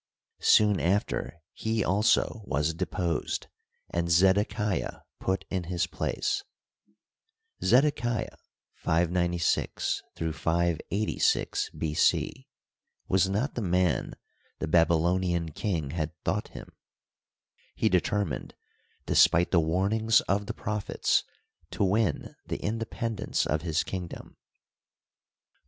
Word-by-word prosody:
Soon 105 -2 +5
after 85 -2 -1
he 110 -1 -1
also 105 +3 +2
was 75 0 0
deposed, 85 -1 -2 0.5
and 85 0 -1
Zedekiah 95 +4 +2 0.2
put 95 0 -1
in 95 -2 -2
his 90 0 0
place. - - -2 1.2
Zedekiah 120 -4 +2 0.4
(596 85 +1 0
586 85 +5 0
B. 80 -2 -2
c.) - - +1 0.6
was 95 0 +3
not 110 +9 -1
the 120 - -3
man 90 -2 +1 0.4
the 80 - -3
Babylonian 85 +1 +2
king 80 -5 -2
had 80 -1 -4
thought - - -1
him. - - -11 1.0
He 110 - +1
determined, 105 - 0 0.5
despite 85 +2 +4
the 85 - +5
warnings 100 +8 +2
of 100 +1 -1
the - - -3
prophets, 105 -1 0 0.5
to - - -1
win 100 +1 +1
the - - -2
independence 115 0 -2
of 75 +1 0
his 80 -2 0
kingdom. 90 -3 -7
90 Hz, 100 wpm, -28 LUFS, 85-105 Hz, 1.2 s, Soon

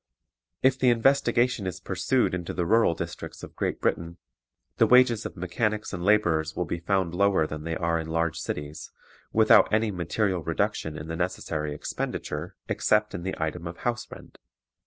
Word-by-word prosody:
If 130 0 +4
the 130 - +4
investigation 120 -3 +2
is 90 0 -4
pursued 95 +8 0
into 90 -3 -4
the 85 0 0
rural 110 -2 +3
districts 85 +1 -7
of - - -10
Great - - -2
Britain, 85 0 -1 0.6
the - - +5
wages 125 -2 +5
of - - -14
mechanics 110 -2 -2
and 90 -1 -4
laborers 85 -7 +2
will 90 - -1
be 85 - -3
found 90 -1 0
lower 95 -3 +3
than 75 0 -6
they 85 0 -2
are 85 -1 0
in 80 - -5
large 80 0 -1
cities, 75 -1 -5 0.4
without - - +5
any 110 0 +2
material 90 +1 -1
reduction 80 0 -2
in 75 - -7
the 80 - -4
necessary 85 -3 -2
expenditure - - -4
except 105 0 +1
in - - -4
the 95 +2 -3
item 80 +2 -3
of 85 - -7
house 120 0 -2
rent. - - -13
90 Hz, 175 wpm, -26 LUFS, 85-110 Hz, 0.6 s, the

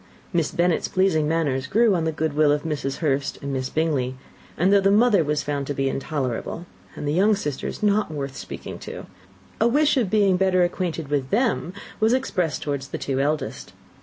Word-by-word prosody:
Miss 165 -3 +1
Bennet's 175 -1 +1
pleasing 185 -5 +2
manners 145 -5 0
grew 220 - +3
on 170 -3 0
the 160 - +1
good 155 -1 -2
will 150 0 +4
of 145 0 0
Mrs. 145 -4 -3
Hurst 140 -1 0
and 140 0 -3
Miss 130 -1 -2
Bingley; 145 -5 0 0.4
and 185 +4 +3
though 200 - +5
the 195 - +3
mother 210 -3 +4
was 150 0 -1
found 145 -2 -3
to 145 - -3
be 135 0 0
intolerable, 135 +3 -3 0.3
and 150 - -5
the 145 - 0
younger 200 +5 +3
sisters 145 +3 -4
not 210 -1 +2
worth 140 -3 -5
speaking - - -7
to, - - -8 0.5
a 225 - +4
wish 295 +4 +3
of 230 -7 +1
being 200 -3 +3
better 185 -1 +3
acquainted 175 -4 -2
with 140 -3 -1
them 225 -6 +1 0.3
was 220 +2 +3
expressed 185 - -1
towards 140 -2 -3
the - - -5
two 135 -1 -2
eldest. 150 +2 -2
160 Hz, 195 wpm, -23 LUFS, 140-195 Hz, 0.5 s, though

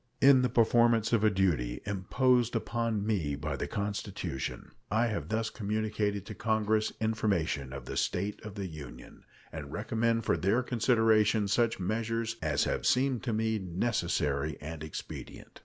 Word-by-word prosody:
In 135 -1 +7
the 125 - +2
performance 115 -1 +3
of 110 -2 +3
a 110 - +6
duty 90 -12 0
imposed 120 +5 +1
upon 115 -2 -1
me 90 -10 0
by 75 +1 -3
the - - -3
Constitution, 100 -9 -4 0.2
I 110 +3 +2
have 110 -3 -3
thus 110 +1 -1
communicated 105 -1 -2
to - - -7
Congress 110 -1 +1
information 100 -11 0
of 70 +1 -7
the - - -5
state 100 +3 -1
of 105 -2 -8
the 100 -2 -4
Union 80 -5 -10 0.3
and - - -7
recommended 115 0 0
for - - +2
their 105 +7 +2
consideration 110 -3 +3
such 115 +2 +1
measures 115 +3 -2
as 75 -2 +1
have - - -1
seemed 130 -1 +2
to 120 - 0
me 110 0 0
necessary 85 -7 -1
and 80 +1 -7
expedient. 80 - -8
110 Hz, 155 wpm, -30 LUFS, 90-115 Hz, 0.3 s, In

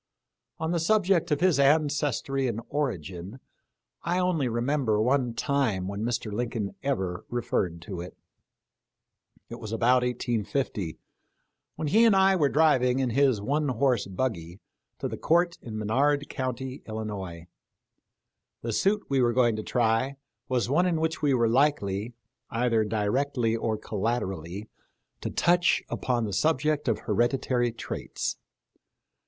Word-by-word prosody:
On 160 +1 -2
the 170 - +1
subject 180 -1 +2
of 150 -2 0
his 180 -6 +4
ancestry 140 -2 +2
and 115 -2 -2
origin 95 - -3 0.6
I 175 +1 -1
only 180 -7 +1
remember 120 -1 0
one 125 +1 +1
time 115 -8 0
when 100 +1 -4
Mr. 115 -2 -2
Lincoln 115 -2 -2
ever 95 -10 -2
referred 90 -8 -1
to 90 -2 -6
it. 90 - -9 1.3
It 115 - -7
was 110 -2 -7
about 120 +3 +3
1850, 120 - -2 0.8
when 155 - -3
he 220 +7 +5
and 225 -4 +6
I 190 0 +5
were 150 -6 +3
driv 150 -3 +4
ing 125 0 +2
in 130 -2 0
his 135 -2 +3
one 145 +6 0
horse 125 -3 +1
buggy 95 -4 -3 0.4
to - - -3
the - - -5
court 170 +1 +2
in 110 -2 -7
Menard 140 +7 +1
county, 130 +1 -4
Illinois. 100 -6 -5 1.2
The 115 -1 -2
suit 205 - +2
we 135 -1 +2
were 120 -1 +3
going 120 -2 +3
to - - -2
try 120 +3 +1 0.3
was 125 -2 +1
one 165 +8 +3
in 165 -3 +1
which 160 0 -1
we 145 -3 +3
were 120 -2 +3
likely, 115 -4 +1 0.3
either 115 -1 +1
directly 115 +3 0
or 110 -1 -1
collaterally, 100 -3 -3 0.5
to - - -3
touch 175 0 +3
upon 120 -2 -1
the 100 - -4
subject 150 +6 +1
of 115 - +1
hereditary 120 +2 +1
traits. 115 - -4
125 Hz, 140 wpm, -27 LUFS, 110-145 Hz, 1.3 s, and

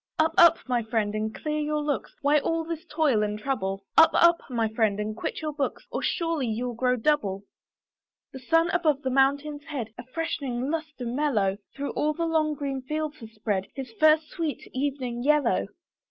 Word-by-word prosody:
Up! 315 0 +2
up! 340 -1 +7
my 245 -2 +1
friend, 220 -2 -1
and 215 0 -2
clear 305 0 -2
your 300 0 -1
looks, 290 -2 -2
Why 295 +1 +4
all 330 +3 -1
this 325 0 -5
toil 300 -8 +2
and 210 0 -1
trouble? 195 -6 -2
Up! 325 - +8
up! 340 0 +6
my 230 -3 0
friend, 215 -2 0
and 215 +1 -3
quit 225 - -4
your 305 -1 -2
books, 285 -2 -3
Or - - -2
surely 330 -6 -1
you'll 240 +2 -2
grow 250 +2 +1
double. 220 -7 0 0.9
The 265 - -7
sun 330 +6 +2
above 315 -6 +1
the 260 - -1
mountain's 285 +3 +1
head, 240 -8 -5
A - - -6
freshening 265 -2 -3
lustre 310 -5 -4
mellow, 235 -7 0 0.2
Through 280 0 -3
all 305 +1 0
the 335 +2 -2
long 310 -2 +1
green 275 -2 -3
fields 305 +3 -3
has 225 -1 -10
spread, 205 -3 -2
His 265 -3 -6
first 310 0 +5
sweet 320 -4 -4
evening 260 -3 -2
yellow. 300 +2 +2
275 Hz, 185 wpm, -26 LUFS, 235-305 Hz, 0.9 s, Up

